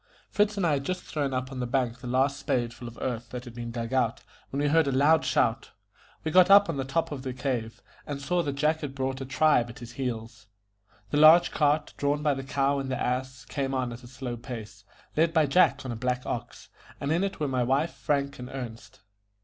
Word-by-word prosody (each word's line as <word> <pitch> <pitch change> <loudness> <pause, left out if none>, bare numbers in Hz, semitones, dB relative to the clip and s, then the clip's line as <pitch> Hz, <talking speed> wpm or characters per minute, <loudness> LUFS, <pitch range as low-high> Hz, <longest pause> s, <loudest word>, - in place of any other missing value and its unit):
Fritz 210 0 +2
and 195 - +1
I 165 - +3
had 140 -2 0
just 185 +4 -3
thrown 145 -3 -2
up 130 0 -3
on 130 - -6
the 125 - -2
bank 125 -1 -1
the 125 - -8
last 135 +3 +1
spade 120 -2 -1
full 120 0 -9
of 120 - -10
earth 120 -2 -3
that 125 0 -6
had 120 - -9
been 120 0 -6
dug 115 +1 -4
out, 120 -3 +1 0.3
when 140 - -3
we 145 - +2
heard 160 0 +3
a - - +1
loud 145 +4 +4
shout. - - +1 0.5
We 160 - -2
got 185 +2 +6
up 200 +1 +8
on 160 - -2
the 135 - -1
top 165 +5 -1
of 140 -3 -5
the 130 -1 -4
cave, 125 -3 -3 0.2
and 145 -1 -4
saw 175 +5 0
that 145 -4 -2
Jack 155 +3 +1
had 140 -3 -5
brought 130 -1 -2
back 135 - -6
a - - -18
tribe 140 -4 +3
at 115 - -10
his 120 -1 -9
heels. 115 -3 -5 0.6
The - - +1
large 160 +3 +8
cart, 150 0 +1
drawn 145 +1 0
by 150 -1 +3
the 135 0 -5
cow 140 +1 +1
and 135 -1 -4
the 130 - -2
ass, 130 0 -2
came 135 -1 -2
on 125 -2 -1
at 120 - -10
a 120 - -12
slow 125 -1 -5
pace, 115 -3 -9 0.3
led 165 +1 +2
by 160 -2 +5
Jack 140 -2 +3
on 130 - -3
a - - -3
black 125 +2 -2
ox, - - -5 0.3
and 140 - -2
in 170 +4 +2
it 195 -2 -3
were 150 - 0
my 130 -2 0
wife, 135 +6 +1
Frank, 140 -1 -1
and 125 0 -7
Ernest. 120 -4 -8
135 Hz, 245 wpm, -27 LUFS, 125-150 Hz, 0.6 s, up